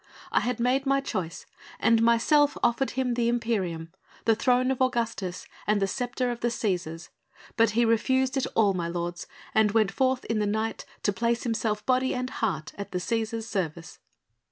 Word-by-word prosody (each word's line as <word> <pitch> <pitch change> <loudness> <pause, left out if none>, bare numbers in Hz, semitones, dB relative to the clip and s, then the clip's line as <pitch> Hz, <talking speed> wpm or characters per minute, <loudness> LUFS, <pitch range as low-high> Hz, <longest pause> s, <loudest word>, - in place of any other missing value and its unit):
I - - +4
had 245 -1 -2
made 260 +3 +1
my 275 0 +3
choice 185 -11 -4 0.3
and 230 0 +4
myself 260 +6 +4
offered 240 +3 +2
him 255 -2 +1
the 235 -1 +1
imperium, 190 -9 -1 0.3
the 225 - +5
throne 250 +3 +2
of 265 - -2
Augustus 230 -7 -1 0.2
and 210 0 +3
the 195 - +2
sceptre 245 +4 -2
of 240 - -5
the 240 - 0
Cæsars.... 175 -7 -2 0.5
But 230 0 +4
he 240 - +5
refused 260 +4 +2
it 270 - 0
all, 205 -3 +4
my 175 -2 -2
lords, 175 0 -4 0.3
and 215 -2 +3
went 215 -3 +3
forth 260 +3 +1
in 225 -1 -1
the 210 - +1
night 220 +2 -2 0.2
to 205 - +2
place 235 +3 0
himself 220 -3 -1
body 260 0 +2
and 255 +1 -3
heart 165 -9 -2
at 200 - -6
the - - 0
Cæsar's 225 +3 -2
service." 170 -6 -4
230 Hz, 180 wpm, -27 LUFS, 195-250 Hz, 0.5 s, the